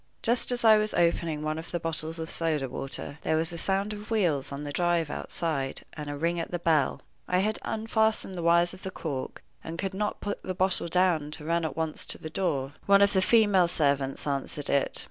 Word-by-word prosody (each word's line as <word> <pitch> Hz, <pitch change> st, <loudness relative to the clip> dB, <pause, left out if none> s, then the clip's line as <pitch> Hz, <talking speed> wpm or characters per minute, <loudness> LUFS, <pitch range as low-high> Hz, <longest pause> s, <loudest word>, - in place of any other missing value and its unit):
Just 240 Hz, +2 st, +3 dB
as 240 Hz, -1 st, 0 dB
I 215 Hz, -1 st, +8 dB
was 215 Hz, 0 st, -1 dB
opening 170 Hz, -3 st, +1 dB
one 155 Hz, +1 st, -2 dB
of 165 Hz, -, -9 dB
the 175 Hz, -, -2 dB
bottles 165 Hz, 0 st, -3 dB
of 160 Hz, 0 st, -4 dB
soda 155 Hz, -5 st, 0 dB
water, 135 Hz, +3 st, -3 dB
there 160 Hz, -, +1 dB
was 165 Hz, +2 st, -1 dB
a -, -, -5 dB
sound 195 Hz, +3 st, 0 dB
of 210 Hz, 0 st, -9 dB
wheels 175 Hz, -, +1 dB
on 140 Hz, +1 st, -5 dB
the 145 Hz, -, -5 dB
drive 170 Hz, -3 st, +1 dB
outside, 140 Hz, -6 st, -2 dB
and 150 Hz, -2 st, -6 dB
a 145 Hz, -, -3 dB
ring 170 Hz, +3 st, 0 dB
at 165 Hz, -, -3 dB
the 175 Hz, -, -2 dB
bell. 160 Hz, -5 st, +1 dB, 0.2 s
I 180 Hz, -, +1 dB
had 210 Hz, +3 st, +1 dB
unfastened 220 Hz, -3 st, 0 dB
the 175 Hz, -, -4 dB
wires 170 Hz, +1 st, +4 dB
of 185 Hz, -, -12 dB
the 190 Hz, -, -5 dB
cork, 145 Hz, -8 st, -5 dB, 0.2 s
and 165 Hz, +1 st, -6 dB
could 195 Hz, +1 st, -2 dB
not 210 Hz, +2 st, -2 dB
put 205 Hz, 0 st, -4 dB
the 185 Hz, -, -4 dB
bottle 185 Hz, -1 st, +1 dB
down 170 Hz, -4 st, +2 dB
to 150 Hz, 0 st, -5 dB
run 170 Hz, +1 st, +1 dB
at 160 Hz, -, -3 dB
once 160 Hz, -1 st, -3 dB
to -, -, +1 dB
the 155 Hz, -, -8 dB
door. 145 Hz, -7 st, -1 dB
One 200 Hz, 0 st, +7 dB
of 200 Hz, -, +3 dB
the 190 Hz, -, +3 dB
female 205 Hz, -4 st, +4 dB
servants 140 Hz, -5 st, 0 dB
answered 140 Hz, 0 st, -2 dB
it. 140 Hz, -1 st, +2 dB
170 Hz, 225 wpm, -28 LUFS, 150-190 Hz, 0.2 s, I